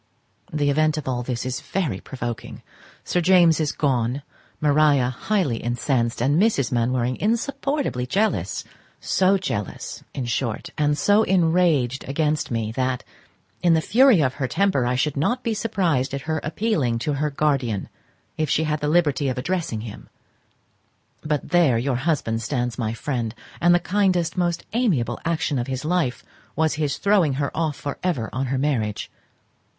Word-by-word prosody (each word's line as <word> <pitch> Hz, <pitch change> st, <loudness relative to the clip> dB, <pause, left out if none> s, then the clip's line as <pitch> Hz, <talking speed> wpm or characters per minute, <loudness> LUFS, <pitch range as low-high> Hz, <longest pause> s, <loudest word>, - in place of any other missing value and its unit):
The 145 Hz, -2 st, +1 dB
event 155 Hz, +1 st, +2 dB
of 150 Hz, -, -5 dB
all 125 Hz, -2 st, -1 dB
this 125 Hz, 0 st, -3 dB
is 130 Hz, 0 st, -2 dB
very 155 Hz, -, -2 dB
provoking: 120 Hz, -3 st, -6 dB, 0.4 s
Sir 180 Hz, -, 0 dB
James 175 Hz, -3 st, +5 dB
is 155 Hz, -2 st, +1 dB
gone, 130 Hz, -1 st, 0 dB, 0.4 s
Maria 145 Hz, -3 st, +3 dB
highly 155 Hz, -, 0 dB
incensed, 120 Hz, 0 st, -1 dB
and 145 Hz, +7 st, +3 dB
Mrs. 145 Hz, -, +2 dB
Mainwaring 125 Hz, +1 st, 0 dB
insupportably 235 Hz, -, -1 dB
jealous; 205 Hz, -, 0 dB, 0.4 s
so 190 Hz, +1 st, +2 dB
jealous, 125 Hz, -, -4 dB
in 130 Hz, -, -2 dB
short, 120 Hz, -1 st, -2 dB
and 150 Hz, -1 st, +1 dB
so 205 Hz, +8 st, +4 dB
enraged 165 Hz, -, +2 dB
against 150 Hz, +1 st, 0 dB
me, 115 Hz, -2 st, -2 dB
that, 130 Hz, +1 st, -1 dB, 0.6 s
in 175 Hz, -2 st, +4 dB
the -, -, +3 dB
fury 240 Hz, -, +5 dB
of 130 Hz, -3 st, +1 dB
her 130 Hz, -, +1 dB
temper, 190 Hz, -8 st, +1 dB
I 125 Hz, -, +1 dB
should 145 Hz, +3 st, 0 dB
not 240 Hz, -, 0 dB
be 230 Hz, -, 0 dB
surprized 175 Hz, -, 0 dB
at 140 Hz, -, -4 dB
her 160 Hz, +1 st, -2 dB
appealing 155 Hz, -, 0 dB
to 145 Hz, +6 st, -1 dB
her 150 Hz, +2 st, 0 dB
guardian, 135 Hz, -8 st, 0 dB, 0.5 s
if 155 Hz, -2 st, 0 dB
she 160 Hz, -, +2 dB
had 150 Hz, -1 st, -1 dB
the 150 Hz, -, -2 dB
liberty 150 Hz, -3 st, +2 dB
of 130 Hz, -, -3 dB
addressing 160 Hz, -6 st, -2 dB
him: 110 Hz, -2 st, -9 dB, 1.1 s
but 150 Hz, -2 st, -2 dB
there 165 Hz, -8 st, +4 dB
your 125 Hz, +1 st, 0 dB
husband 130 Hz, -6 st, -1 dB
stands 120 Hz, -1 st, -2 dB
my 110 Hz, -3 st, -1 dB
friend; 120 Hz, -3 st, -3 dB, 0.3 s
and 175 Hz, +1 st, +5 dB
the -, -, +3 dB
kindest, 180 Hz, -2 st, +1 dB
most 175 Hz, -2 st, -1 dB
amiable 155 Hz, -, +1 dB
action 160 Hz, -4 st, 0 dB
of 120 Hz, -, -3 dB
his 130 Hz, +2 st, -4 dB
life 160 Hz, -7 st, 0 dB, 0.3 s
was 160 Hz, -1 st, +2 dB
his 150 Hz, -2 st, -1 dB
throwing 195 Hz, -8 st, +3 dB
her 140 Hz, +1 st, -2 dB
off 160 Hz, -3 st, 0 dB
for 140 Hz, -, -5 dB
ever 160 Hz, -12 st, -1 dB
on 130 Hz, +1 st, -1 dB
her 130 Hz, +1 st, -1 dB
marriage. 125 Hz, -7 st, -1 dB
145 Hz, 165 wpm, -23 LUFS, 125-175 Hz, 1.1 s, James